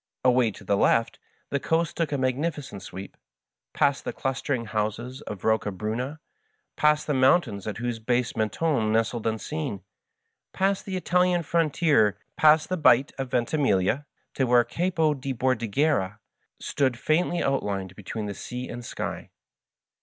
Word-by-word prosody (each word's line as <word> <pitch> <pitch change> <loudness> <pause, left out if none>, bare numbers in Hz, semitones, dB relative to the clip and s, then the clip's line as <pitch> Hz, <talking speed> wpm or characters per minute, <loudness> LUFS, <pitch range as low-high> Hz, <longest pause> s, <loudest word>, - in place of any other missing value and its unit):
Away 125 -2 +4
to - - -13
the 100 +1 +1
left 115 +3 +2 0.3
the 140 - +1
coast 165 +3 0
took 165 -3 -1
a 145 - 0
mag 130 -1 +1
nificent 145 - -4
sweep, 95 +2 -9 0.6
past 140 -1 +1
the - - -3
clustering 130 -2 -2
houses 110 +4 -3
of 105 -3 -6
Kocca 110 -1 +1
bruna, 115 +9 -4 0.6
past 150 0 +3
the 150 - 0
mountains 130 - +3
at 105 - -3
whose 120 -1 -3
base 120 +1 0
Mentone 110 +1 0
nestled 115 +1 0
unseen, 100 -3 -3 0.7
past 195 +1 0
the 190 - -4
Itahan 180 -1 +2
frontier, 150 - +2 0.2
past 155 0 +5
the 185 - 0
bight 135 -4 +4
of 135 -1 -3
Venti 125 +5 0
miglia, 125 0 +1 0.3
to 135 - +1
where 120 0 +5
the - - -18
Capo 165 -3 +1
di 135 -1 -4
Bordighera 115 -3 +1 0.4
stood 130 -4 0
faintly 170 +5 +1
outlined 100 -8 -1
between 105 +1 -5
sea 125 +4 -6
and 120 0 -6
sky. - - -5
125 Hz, 150 wpm, -26 LUFS, 110-150 Hz, 0.7 s, past